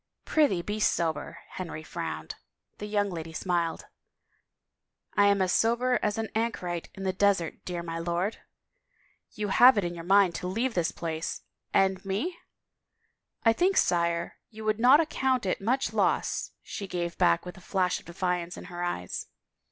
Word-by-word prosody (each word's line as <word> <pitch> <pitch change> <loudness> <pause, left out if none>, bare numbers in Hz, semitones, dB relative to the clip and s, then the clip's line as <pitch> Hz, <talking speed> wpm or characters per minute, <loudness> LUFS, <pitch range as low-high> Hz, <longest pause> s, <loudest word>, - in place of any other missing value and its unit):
" - - -51
Prithee, 245 - +2
be 210 +3 -3
sober," 165 -6 0
Henry 165 -4 -6
frowned. 80 - -5 0.5
The 210 - -5
young 205 -1 0
lady 165 -1 -6
smiled. 170 -1 -1 0.7
" - - -56
I 205 0 +5
am 200 -1 +4
as 185 - 0
sober 240 +2 +2
as 210 0 0
an 225 -1 -2
anchorite 185 -7 -2
in 195 - -7
the 190 -1 0
desert, 190 -4 +1
dear 175 -1 -4
my 165 -1 -4
lord." 175 +5 -1 0.5
" - - -38
You 210 -1 -2
have 245 +4 +7
it 205 - +2
in 175 0 -2
your 170 -1 -7
mind 195 0 +5
to 180 - -4
leave 230 +7 -1
this 175 -4 +1
place 160 -1 -4
— - - -56
and 190 -1 -3
me?" 205 - -2 0.5
" - - -46
I 225 - +6
think, 375 +9 +2
sire, 170 -1 +1
you 220 -1 -9
would 215 0 +1
not 255 +5 +7
account 265 -7 +1
it 185 - -1
much 250 +6 0
loss," - - +1
she 200 - -6
gave 175 -2 -3
back 85 - +3
with 180 - -7
a 190 - -14
flash 185 -1 0
of - - -19
defiance 180 0 -2
in - - -8
her 175 - -5
eyes. 90 - -3
190 Hz, 185 wpm, -28 LUFS, 170-215 Hz, 0.7 s, have